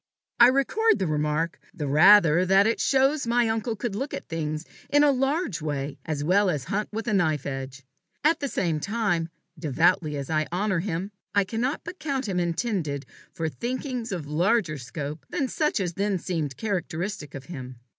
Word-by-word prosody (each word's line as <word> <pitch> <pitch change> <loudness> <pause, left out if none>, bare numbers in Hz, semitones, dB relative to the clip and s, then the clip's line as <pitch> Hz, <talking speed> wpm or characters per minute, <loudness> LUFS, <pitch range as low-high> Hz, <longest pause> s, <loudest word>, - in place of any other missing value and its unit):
I 240 - +10
record 275 - +3
the 190 - -1
remark 155 +1 -1 0.2
the 150 - -3
rather 170 +2 +6
that 195 +2 +5
it 225 - +1
shows 270 0 +2
my 240 0 +3
uncle 225 +1 -1
could 230 -1 -3
look 270 +8 -3
at - - -8
things 155 -1 -3 0.2
in 290 0 +5
a 290 - +6
large 270 - 0
way 145 -2 -3
as 150 -2 -2
well 190 +5 +3
as 150 -7 -1
hunt 210 +8 -2
with 225 +2 -4
a 225 - +1
knife 160 -7 +1
edge. 135 0 -5 0.4
At 315 +2 +3
the 280 - -2
same 170 - -1
time, 200 -3 0 0.3
devoutly 155 +1 +2
as 140 -1 -4
I 155 -1 0
honour 190 0 0
him, 185 +2 -3 0.2
I 200 - +5
cannot 235 +8 -2
but 345 +2 -8
count 275 -5 -2
him 185 -3 0
intended 170 - -1 0.3
for 165 -3 -3
thinkings 245 - -4
of 175 -6 -3
larger 165 +1 +1
scope 140 +4 -6
than 275 - -1
such 300 -1 0
as 180 -3 -2
then 200 +1 0
seemed 160 -7 -3
characteristic 180 -4 -3
of 135 -1 -8
him. 130 -6 -8
185 Hz, 185 wpm, -26 LUFS, 155-230 Hz, 0.4 s, I